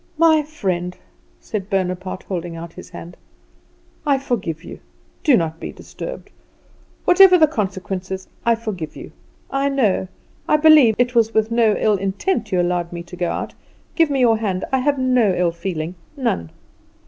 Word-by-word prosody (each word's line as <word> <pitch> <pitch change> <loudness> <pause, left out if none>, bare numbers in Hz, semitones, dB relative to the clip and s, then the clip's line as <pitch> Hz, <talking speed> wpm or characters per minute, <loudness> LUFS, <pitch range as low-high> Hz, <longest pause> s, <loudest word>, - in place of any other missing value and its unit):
"My 320 -1 +5
friend," 185 - -3 0.4
said 200 -2 -5
Bonaparte, 185 -1 -2
holding 175 -3 -5
out 165 0 -8
his 180 - -11
hand, 175 -1 -10 0.9
"I 280 -2 +2
forgive 195 - -3
you; - - -9 0.4
do 285 -6 +5
not 165 -1 -2
be - - -6
disturbed. - - -9 0.7
Whatever 365 0 +7
the 320 - +6
consequences, 190 -6 -4 0.2
I 235 0 +3
forgive 205 -9 -6
you. - - -10 0.4
I 275 +1 +1
know, 220 -9 +1 0.4
I 300 - +4
believe, 300 -7 +6
it 245 0 +1
was 225 -2 +2
with 220 +1 +2
no 230 -2 +3
ill 210 -2 +2
intent 195 - -1
that - - -18
you 185 - +2
allowed 175 -1 0
me 170 -1 -6
to 175 +1 -11
go 175 -1 -1
out. - - -4 0.4
Give 330 -3 +3
me 275 -2 0
your 225 -3 +4
hand. 190 -4 -2
I 265 - +2
have 285 +2 +1
no 250 -7 +2
ill 175 -1 +1
feeling; 170 -1 -4 0.2
none!" 85 - -1
205 Hz, 170 wpm, -20 LUFS, 180-265 Hz, 0.9 s, Whatever